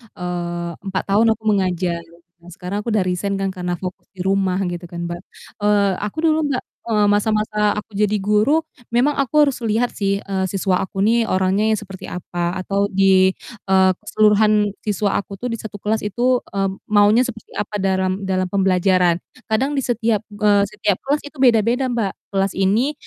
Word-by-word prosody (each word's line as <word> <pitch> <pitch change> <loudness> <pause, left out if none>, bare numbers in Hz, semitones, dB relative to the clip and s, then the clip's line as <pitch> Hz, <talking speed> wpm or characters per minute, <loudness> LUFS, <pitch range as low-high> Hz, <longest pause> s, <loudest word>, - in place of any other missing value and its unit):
eee, 175 -1 -4
4 190 -1 -2
tahun 215 +3 +4
aku 220 - -29
mengajar, 180 -3 0 0.4
dan 170 - -15
sekarang 185 +3 -4
aku 210 - -8
udah 210 -3 +2
resign 185 +2 -1
kan, 195 0 -1
karena 180 -1 -3
fokus 180 +1 -7
di 180 - -4
rumah 195 -1 +1
gitu 175 -1 -4
kan, 170 0 -6
Mbak. 175 - -5 0.4
Eee, 205 -1 +3
aku 210 +5 -5
dulu, 315 -1 +3
Mbak, 265 -3 -2 0.2
eee, 210 -2 +2
masa-masa 210 0 +1
aku 210 +1 -6
jadi 210 +1 +1
guru 210 +11 +2 0.3
memang 265 +5 +3
aku 285 +3 +4
harus 280 -3 0
lihat 230 +1 0
sih, 200 -1 -1
eee, 190 -1 -2
siswa 190 -1 0
aku 195 0 -2
nih 230 +2 +3
orangnya 190 +3 +1
yang 220 - +3
seperti 195 -2 -9
apa 175 0 -3
atau 200 +1 0
di, 190 -1 +4 0.3
eee, 190 -1 +5
keseluruhan 210 -1 +3
siswa 205 -1 0
aku 200 0 -8
tuh 240 +5 -4
di 230 - -4
1 215 -1 -8
kelas 215 +1 +1
itu, 245 +5 +1 0.2
eee, 195 0 +1 0.2
maunya 210 +4 +4
seperti 225 -3 -10
apa, 210 0 -4
dalam 190 0 0
dalam 185 -1 0
pembelajaran. 185 -2 +2 0.3
Kadang 270 +7 +1
di 270 - 0
setiap, 230 -3 0
eee, 205 -1 +3
di 200 - -3
setiap 200 -1 +2
kelas 290 +2 0
itu 290 - -15
beda-beda, 245 +2 +3
Mbak. 225 -5 -1 0.2
Kelas 195 -1 0
ini, 210 +10 +1
200 Hz, 180 wpm, -20 LUFS, 190-220 Hz, 0.4 s, eee